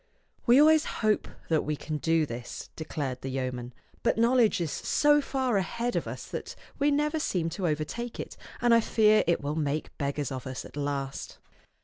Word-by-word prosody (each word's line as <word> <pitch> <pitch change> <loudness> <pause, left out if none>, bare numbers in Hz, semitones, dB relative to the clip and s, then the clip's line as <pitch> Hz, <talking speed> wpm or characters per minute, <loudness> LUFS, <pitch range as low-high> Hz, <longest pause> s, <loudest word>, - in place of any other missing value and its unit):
"We 245 +3 +7
always 310 +1 +6
hope 215 -1 0 0.2
that 160 -2 +2
we 150 - -1
can 155 +1 -4
do 165 +1 +2
this," 120 -2 -7
declared 140 -5 -4
the 135 - -4
yeoman; 125 -2 -3 0.2
" - - -32
but - - +1
knowledge 235 -2 +4
is 165 -4 -1
so 295 0 +3
far 260 -5 0
ahead 235 +6 -1
of - - -1
us - - -6
that - - -6 0.2
we 285 +1 +4
never 300 +2 +1
seem 175 - 0
to 180 +1 -2
overtake 160 +11 -3
it; - - -6 0.3
and 240 -1 +5
I 230 - +7
fear 215 -1 +4
it 170 - +2
will 145 +1 -2
make 150 -1 -2
beggars 140 -1 -2
of 130 0 -5
us 130 -1 -5
at - - -12
last." 140 -2 -3
165 Hz, 195 wpm, -28 LUFS, 140-240 Hz, 0.3 s, We